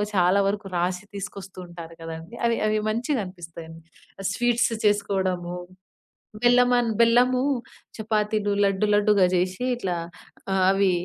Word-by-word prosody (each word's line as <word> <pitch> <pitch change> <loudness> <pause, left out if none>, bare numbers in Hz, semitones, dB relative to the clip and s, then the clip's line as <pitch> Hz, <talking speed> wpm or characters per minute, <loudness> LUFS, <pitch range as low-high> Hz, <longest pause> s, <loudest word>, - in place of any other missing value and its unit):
చాలా 180 +1 +4
వరకు 205 0 -4
రాసి 180 +2 -1
తీసుకొస్తూ 195 -1 -7
ఉంటారు 170 -1 -10
కదండీ, 165 +6 -8
అవి 235 0 +2
అవి 215 0 +1
మంచిగనిపిస్తాయండి. 180 - -4 0.4
ఆహ్, 195 - -1
స్వీట్స్ 240 -1 +1
చేసుకోడము, 190 -4 0 0.9
బెల్లమన్ 245 -1 +4
బెల్లము, 245 +2 +4 0.6
చపాతీలు, 215 -1 0
లడ్డు 195 +1 +1
లడ్డుగా 205 -2 +4
జేషి 185 +5 -1
ఇట్లా 190 -7 -2 0.6
ఆహ్, 190 -1 +2
అవీ 195 -1 +3
200 Hz, 115 wpm, -25 LUFS, 180-230 Hz, 0.9 s, చాలా